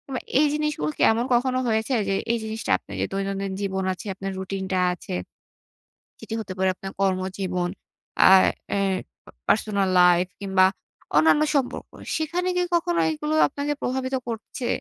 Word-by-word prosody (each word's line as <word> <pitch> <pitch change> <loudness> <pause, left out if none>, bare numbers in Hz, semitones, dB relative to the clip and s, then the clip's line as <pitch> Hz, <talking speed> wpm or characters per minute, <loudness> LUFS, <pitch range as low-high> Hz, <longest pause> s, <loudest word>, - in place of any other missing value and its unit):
বা - - -1 0.2
এই 300 - +5
জিনিসগুলো 300 - -1
কি - - -4
এমন 230 +2 0
কখনো 255 +1 +2
হয়েছে 220 +3 0 0.2
যে, - - +1 0.2
এই 235 - +1
জিনিসটা 220 0 -4
আপনের - - -11
যে - - +2
দৈনন্দিন 195 0 -2
জীবন 190 -1 -1
আছে, 185 - -11
আপনার 195 +1 -5
রুটিনটা 190 0 -2
আছে, 165 - -6 1.0
যেটি - - -7
হতে 190 -4 -5
পারে 190 0 +2
আপনার 195 +1 -7
কর্মজীবন, 185 -1 -1 0.6
আ - - +9 0.4
অ্যা 200 - +1 0.5
প - - -50 0.2
পার্সোনাল 200 -3 +2
লাইফ 180 0 +5
কিংবা 190 -2 +3 0.5
অন্যান্য 160 - +5
সম্পর্ক। 265 -3 -1 0.3
সেখানে 340 +3 -1
কি 360 - +2
কখনো 340 0 +1
এগুলো 300 0 -3
আপনাকে 290 +1 -2
প্রভাবিত 260 +1 -1
করছে? 235 +2 -5
200 Hz, 155 wpm, -24 LUFS, 190-260 Hz, 1.0 s, আ